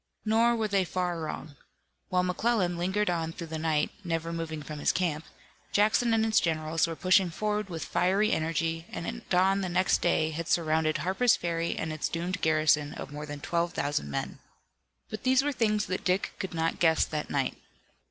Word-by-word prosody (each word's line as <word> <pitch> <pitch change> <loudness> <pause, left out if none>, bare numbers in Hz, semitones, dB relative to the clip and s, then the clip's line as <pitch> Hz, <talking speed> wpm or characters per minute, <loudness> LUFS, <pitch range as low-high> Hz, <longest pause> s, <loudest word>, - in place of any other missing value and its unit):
Nor 230 +2 +3
were 220 -2 0
they 200 -2 +2
far 180 0 -2
wrong. 155 -1 -6 0.5
While 180 0 +2
McClellan 180 0 +1
lingered 190 +5 0
on 165 -2 -1
through 170 - -7
the 160 - -2
night, 155 -2 +1
never 165 -1 -2
moving 160 -2 -4
from 150 +1 -7
his - - +2
camp, 165 -3 -1 0.5
Jackson 215 +3 +3
and 225 0 +3
his 220 -1 +4
generals 160 0 0
were 165 - -4
pushing 185 +1 +3
forward 210 +3 -2
with 165 -2 -5
fiery 200 +4 +2
energy 165 +1 -1
and 170 - -5
at 230 0 -6
dawn 190 +2 +3
the 185 - -2
next 185 +2 +2
day 160 -2 +2
had 165 +1 -4
surrounded 155 -1 +1
Harper's 205 +7 +3
Ferry 170 -1 -2
and 160 -1 -3
its 155 - -2
doomed 180 +3 -3
garrison 155 -2 +2
of - - -7
more 150 +1 -6
than 145 -1 -7
twelve 170 +1 -1
thousand 145 - -1
men. 70 - -4 0.7
But 215 - -5
these 260 +1 +3
were 290 - 0
things 215 -5 +1
that 185 0 -3
Dick 185 +2 0
could 190 -3 -4
not 165 +2 -1
guess 165 -3 +4
that 150 -1 -4
night. - - -1
175 Hz, 190 wpm, -28 LUFS, 160-195 Hz, 0.7 s, his